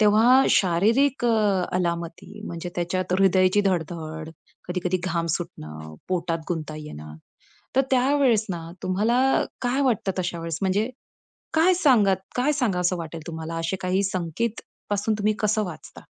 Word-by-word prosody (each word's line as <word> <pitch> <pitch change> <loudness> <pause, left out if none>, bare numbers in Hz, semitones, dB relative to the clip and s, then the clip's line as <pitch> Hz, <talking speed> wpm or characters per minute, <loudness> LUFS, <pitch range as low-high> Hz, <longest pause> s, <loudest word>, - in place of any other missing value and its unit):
तेव्हा 225 +5 +6
शारीरिक 230 +10 +3
अ, 210 -5 +2
अलामती 170 +3 -4
म्हणजे 170 +1 -5
त्याच्यात 180 +1 -1
हृदयाची 190 +1 +4
धड-धड, 160 -2 -3 0.4
कधी-कधी 180 0 -1
घाम 170 -2 -1
सुटणं, 80 - -8
पोटात 170 -2 -1
गुंता 155 -3 -3
येणं. 75 - -9 0.6
तर - - +7
त्यावेळेस 260 -3 +3
ना 170 -2 -4 0.2
तुम्हाला 215 +7 +1 0.4
काय 250 +3 +1
वाटतं 225 -7 +1
तशा 175 -1 -2
वेळेस 165 -1 -4
म्हणजे 200 +4 +1 0.7
काय 340 +3 +5
सांगत 215 - +3
काय 260 +4 +2
सांगावसं 185 -10 +1
वाटेल 165 -1 -6
तुम्हाला 160 0 -5
असे 165 +3 -1
काही 185 +2 +1
संकेत 190 +4 -2 0.3
पासून 205 +2 +1
तुम्ही 210 +1 +1
कसं 215 0 +1
वाचता? 180 -4 -9
185 Hz, 135 wpm, -24 LUFS, 170-220 Hz, 0.7 s, तर